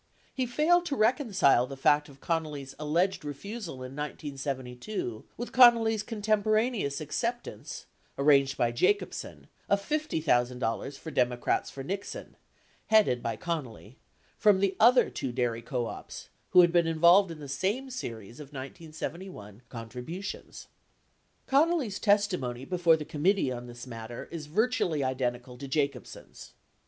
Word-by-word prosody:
80 265 - -4
He - - +2
failed 330 +8 +3
to 285 - -1
reconcile 215 - +3
the 135 - -8
fact 145 +1 +3
of 135 -1 -16
Connally's 150 -5 -3
alleged 170 +6 0
refusal 170 - -6
in 130 +1 -8
1972 135 - -5
with 240 - -5
Connally's 230 -3 +6
contemporaneous 215 - 0
acceptance 235 - -4 0.2
( - - -38
arranged 140 -1 +4
by 120 -1 +2
Jacobsen) 405 - -1 0.2
of 200 - +3
$50,000 135 - -1
for 160 - -8
Democrats 125 -2 0
for 135 - -8
Nixon 195 +7 -6 0.5
(headed 210 - +4
by 115 - -2
Con 165 -5 -2
nally) 115 +1 -14 0.4
from 205 -3 +5
the 195 -1 +1
other 245 +3 +6
two 130 - -3
dairy 120 -2 -1
co 120 0 -2
ops - - -8 0.2
who 180 - +8
had 175 -1 +4
been 170 -1 +3
involved 170 +4 +5
in 165 - -7
the 145 - -8
same 200 - -2
series 115 - -7
of 150 - -8
1971 145 - -8
contributions. 125 - -7 0.8
81 280 +4 +5
Connally's 280 - -1
testimony 180 - +1
before 175 -2 +3
the 150 - -6
committee 165 0 +1
on 120 0 -6
this 120 +1 -9
matter 115 -1 -8
is 160 -3 -6
vir 215 +10 +2
tually 165 - 0
identical 125 -1 -3
to 140 - -6
Jacobsen's. 140 0 -4
155 Hz, 145 wpm, -29 LUFS, 130-205 Hz, 0.8 s, who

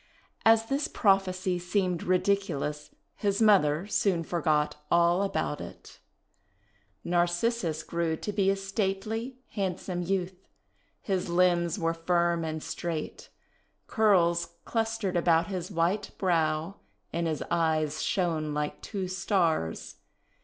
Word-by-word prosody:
As 225 0 +5
this 275 +5 -1
prophecy 185 -3 +1
seemed 180 -1 0
ridiculous, 180 -6 0 0.3
his 200 -1 0
mother 190 -7 +4
soon 195 -4 +1
for 170 +1 -3
got 150 -1 +1
all 170 +2 +4
about 200 - -1
it. - - -11 1.0
Narcissus 175 0 0
grew 170 -1 -1
to 210 - -4
be 195 -1 +2
a 195 - +3
stately, 205 +5 -3
handsome 185 -2 -3
youth. 185 0 -3 0.6
His 190 -3 -1
limbs 175 0 +2
were 165 -3 0
firm 170 0 +1
and 155 -1 -4
straight. 165 -3 -5 0.6
Curls 170 -6 +2
clustered 225 -4 -1
about 170 -1 +3
his 185 -2 -4
white 185 +3 0
brow, 165 0 0 0.4
and 170 0 0
his 155 -2 -2
eyes 155 -2 +1
shone 160 -5 -1
like 150 0 -3
two 195 -3 -4
Stars. 175 - -1
180 Hz, 115 wpm, -28 LUFS, 165-195 Hz, 1.0 s, As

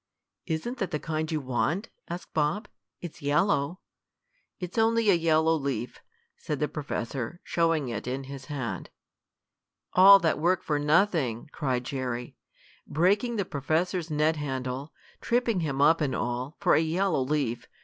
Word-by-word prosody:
"Isn't 180 +10 -3
that 195 - -1
the - - -1
kind 155 +1 -3
you 155 - 0
want?" 145 - -1 0.2
asked 175 +1 -7
Bob. 160 +8 0 0.3
"It's 175 -3 -8
yellow." 150 +2 +1 0.8
"It's 180 +4 -3
only 225 -1 +4
a - - +6
yellow 160 -1 +3
leaf," 135 -5 -3 0.4
said 150 -3 -4
the 150 - +1
professor, 140 0 -4
showing 165 -5 +1
it 115 0 -5
in 130 +2 -3
his 135 0 -8
hand. 120 - -4 1.0
"All 195 +2 +9
that 165 -6 0
work 175 +3 +2
for 150 -1 0
nothing!" 150 - +1
cried 130 -5 -1
Jerry. 125 -2 -4 0.5
"Breaking 200 +9 +2
the 200 -3 -1
professor's 165 +5 -1
net 155 +1 +1
handle, 135 0 -4 0.3
tripping 235 -4 +1
him 145 -5 -2
up 160 +2 +5
and 140 -3 0
all, 125 +6 -3
for 185 -3 +3
a - - +5
yellow 170 -1 +1
leaf. 130 -3 -1
155 Hz, 150 wpm, -28 LUFS, 135-180 Hz, 1.0 s, All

